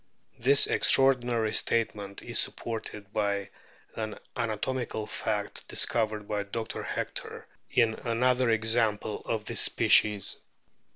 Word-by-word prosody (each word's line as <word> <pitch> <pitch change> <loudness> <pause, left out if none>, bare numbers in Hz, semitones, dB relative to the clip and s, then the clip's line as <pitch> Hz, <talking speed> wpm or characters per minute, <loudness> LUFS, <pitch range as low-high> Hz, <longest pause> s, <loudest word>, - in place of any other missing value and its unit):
This 135 +4 +6
extraordinary 120 -4 +3
statement 105 -4 +1
is - - -2
supported 105 -3 -4
by 100 -2 -2 0.4
an 110 -1 -5 0.2
anatomical 115 0 -3
fact 105 -1 -4
discovered 110 -2 0
by 105 -1 -2
Dr. 110 +2 -6
Hector - - -5 0.2
in 115 -3 +2
another 125 +1 +1
example 110 -2 +1
of 110 -2 -3
this - - +1
species. 105 -2 +3
110 Hz, 105 wpm, -27 LUFS, 105-120 Hz, 0.4 s, This